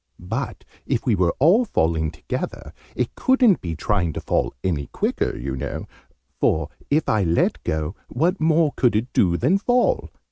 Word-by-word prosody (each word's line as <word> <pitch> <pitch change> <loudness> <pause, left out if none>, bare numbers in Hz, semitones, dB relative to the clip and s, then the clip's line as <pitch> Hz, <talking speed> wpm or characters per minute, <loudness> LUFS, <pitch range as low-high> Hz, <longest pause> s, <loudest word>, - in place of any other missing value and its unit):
But, 115 +8 -5 0.2
if - - -1
we - - +3
were 90 -2 +1
all 175 - +5
falling 80 - 0
together, - - -5 0.2
it 125 -2 -1
couldn't 255 -7 +3
be 85 -2 -4
trying 90 -2 0
to - - -4
fall - - 0
any 75 -6 -1
quicker, - - -1
you 65 +2 -4
know: 65 - -4 0.5
for, 80 -2 +1 0.2
if 150 +2 +2
I 110 - +2
let 85 -2 +1
go, 80 +3 -2
what 170 +9 0
more 160 -1 +3
could 120 -4 +2
it 115 +4 -1
do 85 -3 +3
than 165 - +2
fall? 245 +4 +1
110 Hz, 170 wpm, -22 LUFS, -, 0.5 s, all